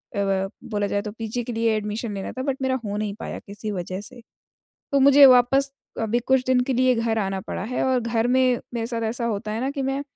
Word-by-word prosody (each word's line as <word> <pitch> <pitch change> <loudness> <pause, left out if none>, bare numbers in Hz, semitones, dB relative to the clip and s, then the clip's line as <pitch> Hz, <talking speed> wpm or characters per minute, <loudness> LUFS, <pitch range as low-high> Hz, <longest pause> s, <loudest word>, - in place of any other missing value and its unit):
अ, 200 - -1
व 195 -1 0 0.2
बोला 205 -2 -1
जाए 200 0 -1
तो 210 - -6
पीजी 225 +2 -4
के 240 0 -5
लिए 225 0 +1
एडमिशन 210 +1 -3
लेना 195 -1 -5
था 260 - -5
बट 270 -1 -1
मेरा 260 0 +1
हो 205 - -3
नहीं 210 -1 -2
पाया - - -5
किसी 205 +1 -7
वजह 185 +1 -4
से। 245 +2 -11 0.7
तो 280 - +3
मुझे 280 +1 +8
वापस 270 +2 +5 0.3
अभी 225 +2 +1
कुछ 260 +1 +2
दिन 255 -1 +3
के 265 - +1
लिए 255 0 +3
घर 230 -1 0
आना 195 -1 -1
पड़ा - - -4
है 245 +4 -2
और 260 -1 +2
घर 230 0 0
में 255 -1 +3
मेरे 230 -1 -2
साथ 230 -1 -3
ऐसा 235 +1 -3
होता 210 -2 -2
है 220 - -2
ना 265 - 0
कि 280 -1 -4
मैं 270 +1 -1
230 Hz, 250 wpm, -24 LUFS, 210-255 Hz, 0.7 s, मुझे